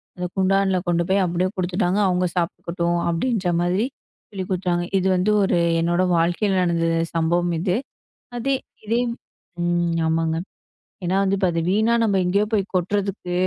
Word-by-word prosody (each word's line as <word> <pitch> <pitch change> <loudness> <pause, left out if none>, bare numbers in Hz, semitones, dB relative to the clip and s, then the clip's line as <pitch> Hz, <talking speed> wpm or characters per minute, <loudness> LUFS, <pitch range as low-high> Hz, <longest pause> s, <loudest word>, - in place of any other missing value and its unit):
அந்த 180 - -4
குண்டான்ல 190 0 +2
கொண்டு 170 0 +2
போய் 195 +1 +3
அப்பிடியே 180 +1 0
குடுத்துட்டாங்க. 185 +1 0
அவுங்க 180 0 +1
சாப்பிட்டுக்கட்டும் 170 0 -1
அப்பிடின்ற 180 +1 0
மாதிரி 185 +6 +1 0.4
சொல்லிக் 190 -3 -6
குடுத்தாங்க. 180 -2 0
இது 190 0 +1
வந்து 185 +4 +2
ஒரு 185 - +2 0.2
என்னோட 175 +2 +1 0.2
வாழ்க்கையில 180 +4 +1
நடந்த 170 -2 +1 0.3
சம்பவம் 170 +1 +1
அது. 180 +1 0 0.6
அதே, 270 +3 0 0.3
இதே 230 +3 +1 0.6
ம், 175 -1 +1
ஆமாங்க. 160 0 0 0.7
ஏன்னா 185 +2 +1 0.2
இப்ப 190 -1 +1
அது 165 - 0
வீணா 220 +4 +2
நம்ம 210 -3 +2
எங்கயோ 200 +4 +2
போய்க் 200 -2 0
கொட்டுறதுக்கு 190 0 -1
180 Hz, 145 wpm, -22 LUFS, 175-195 Hz, 0.7 s, போய்